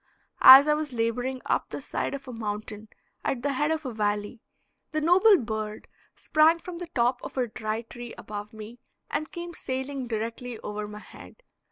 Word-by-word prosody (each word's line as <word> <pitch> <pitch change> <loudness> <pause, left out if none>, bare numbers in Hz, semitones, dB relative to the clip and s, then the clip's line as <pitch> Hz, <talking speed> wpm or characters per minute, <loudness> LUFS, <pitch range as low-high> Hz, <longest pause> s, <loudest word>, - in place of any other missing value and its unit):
As 270 +3 +11
I 300 - +4
was 300 -3 -3
laboring 245 +3 -2
up - - 0
the - - -5
side - - -3
of 275 -1 -9
a 250 - -7
mountain 215 -1 -5 0.4
at 245 - -2
the 285 -1 0
head 295 +3 +1
of 320 -1 -1
a 255 - -4
valley, 210 +1 -2 0.5
the 310 - -1
noble 370 +6 +6
bird 215 -4 -5 0.3
sprang 315 +2 +4
from 345 0 -8
the 350 0 -6
top 245 +1 +2
of - - -9
a 255 - +2
dry 220 0 -4
tree 240 +1 -9
above 210 0 -7
me 220 +2 -10 0.3
and 310 - -2
came 345 0 -7
sailing 265 -2 -4
directly 230 +2 -4
over 210 0 -5
my 210 0 -9
head. - - -13
245 Hz, 185 wpm, -27 LUFS, 220-295 Hz, 0.5 s, As